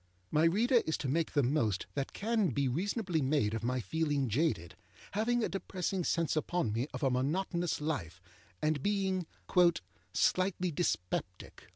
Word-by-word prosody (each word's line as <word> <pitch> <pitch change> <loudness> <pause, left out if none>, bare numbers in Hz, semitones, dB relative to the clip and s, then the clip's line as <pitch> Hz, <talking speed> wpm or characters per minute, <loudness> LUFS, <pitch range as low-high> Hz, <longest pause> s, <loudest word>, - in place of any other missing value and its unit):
My 155 +2 +4
reader 230 +8 +4
is 160 - +1
to 140 - -3
make 160 +5 0
the 145 - +3
most 120 -7 +1
that 140 -1 -2
can 220 -1 +1
be 140 +1 0
reasonably 180 - -1
made 130 -6 +1
of 115 0 -3
my 125 +2 0
feeling 145 - 0
jaded, 110 - 0 0.4
having 230 +3 +1
a - - +2
depressing 190 -1 -2
sense 165 -2 +1
upon 155 -7 0
me 120 +5 -1
of - - -6
a 135 - +3
monotonous 170 +6 0
life, 110 - -3 0.4
and 155 -2 +1
being 190 -2 0 0.2
âslightly 175 - +1
dyspeptic. 115 - -3
155 Hz, 155 wpm, -32 LUFS, 130-185 Hz, 0.4 s, My